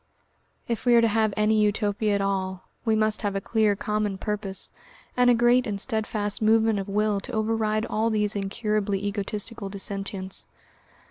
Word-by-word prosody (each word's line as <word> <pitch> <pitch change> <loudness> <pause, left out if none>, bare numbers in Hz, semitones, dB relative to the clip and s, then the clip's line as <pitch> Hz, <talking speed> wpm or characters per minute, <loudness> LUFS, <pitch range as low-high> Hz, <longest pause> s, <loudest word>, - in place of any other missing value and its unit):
If 235 -3 -2
we 240 - +6
are 235 - +7
to 230 - +4
have 220 0 +2
any 215 0 +3
Utopia 210 0 +1
at 200 - 0
all, 190 -1 -2 0.2
we 220 -1 +3
must 215 0 +3
have 205 -2 -2
a - - +1
clear 215 0 +1
common 210 -1 -2
purpose, 200 -2 -4 0.4
and 250 0 +4
a 245 - +6
great 240 +1 +3
and 200 -2 -2
steadfast 215 -2 -2
movement 220 -1 +3
of 195 +1 -5
will 210 0 +1
to - - -9
override 220 0 0
all 225 0 0
these 210 -1 0
incurably 205 0 -1
egotistical 205 +1 -3
dissentients. 195 -1 -3
210 Hz, 165 wpm, -25 LUFS, 200-220 Hz, 0.4 s, are